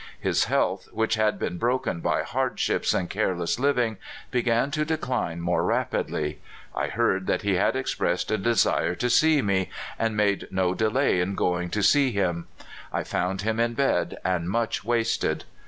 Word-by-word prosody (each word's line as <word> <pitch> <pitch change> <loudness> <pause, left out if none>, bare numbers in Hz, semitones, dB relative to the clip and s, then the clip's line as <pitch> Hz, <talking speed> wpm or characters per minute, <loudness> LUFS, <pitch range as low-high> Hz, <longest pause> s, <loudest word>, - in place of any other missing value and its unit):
His - - +1
health, - - 0
which 110 0 0
had 110 -1 +1
been 90 - -3
broken 120 -7 0
by - - 0
hardships - - 0
and 90 - 0
careless 95 -1 -1
living, 125 -5 +1 0.3
began 120 +2 +1
to 150 +1 0
decline 130 - -2
more 85 +1 +1
rapidly. - - -1 0.3
I - - 0
heard 95 0 0
that - - 0
he 100 -1 +1
had 95 +7 +2
expressed 130 -4 -1
a 110 - +1
desire 95 -4 +2
to 125 +4 0
see 155 -1 +4
me, 95 -2 +1 0.3
and 115 -2 0
made 100 -1 +1
no 95 -1 +1
delay 110 0 +2
in 95 +2 -1
going 90 -1 0
to 100 +3 -1
see 140 +6 +5
him. 90 -5 -1 0.4
I - - -1
found 95 +2 -2
him 110 +1 -1
in 115 0 +1
bed 140 +2 +1
and 90 -2 0
much 115 +1 -1
wasted. 115 0 0
110 Hz, 170 wpm, -25 LUFS, 95-120 Hz, 0.4 s, see